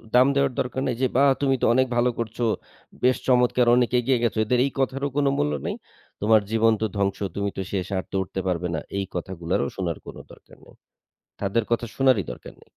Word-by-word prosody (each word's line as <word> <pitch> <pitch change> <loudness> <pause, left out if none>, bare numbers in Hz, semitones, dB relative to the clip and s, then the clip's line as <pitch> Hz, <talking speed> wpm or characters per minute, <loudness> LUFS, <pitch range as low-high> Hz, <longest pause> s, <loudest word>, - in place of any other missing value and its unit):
দাম 125 +2 +7
দেওয়ার 140 -1 +2
দরকার 130 +1 -2
নাই 125 - -1
যে, 130 - +4
"বাহ! 140 0 +6
তুমি 135 -1 +3
তো - - +3
অনেক 130 +1 +3
ভালো 125 +1 +3
করছো। 115 +1 -2 0.6
বেশ 130 0 +4
চমৎকার 125 -1 +3
অনেক 125 -1 +3
এগিয়ে 120 0 +1
গেছো।" 115 -2 0
এদের 125 +2 +1
এই 140 - -2
কথারও 135 +1 0
কোন 145 - +2
মূল্য 75 0 0
নেই। - - -2 0.5
"তোমার 110 0 +5
জীবন 115 0 +4
তো - - +2
ধ্বংস 100 -1 0 0.2
তুমি 100 0 -1
তো - - -1
শেষ। 95 -2 -2
আর 95 - -2
তো - - -5
উঠতে 95 +1 -5
পারবে 90 -1 -1
না।" - - -1 0.2
এই 100 - -1
কথাগুলারও 85 -5 -2
শোনার 85 -4 -2
কোন - - -9 0.2
দরকার - - -17
নেই। - - -18 0.7
তাদের 105 +3 0
কথা 120 0 0
শোনারই 130 - +3
দরকার - - -11
নেই। - - -20
115 Hz, 210 wpm, -24 LUFS, 95-130 Hz, 0.7 s, দাম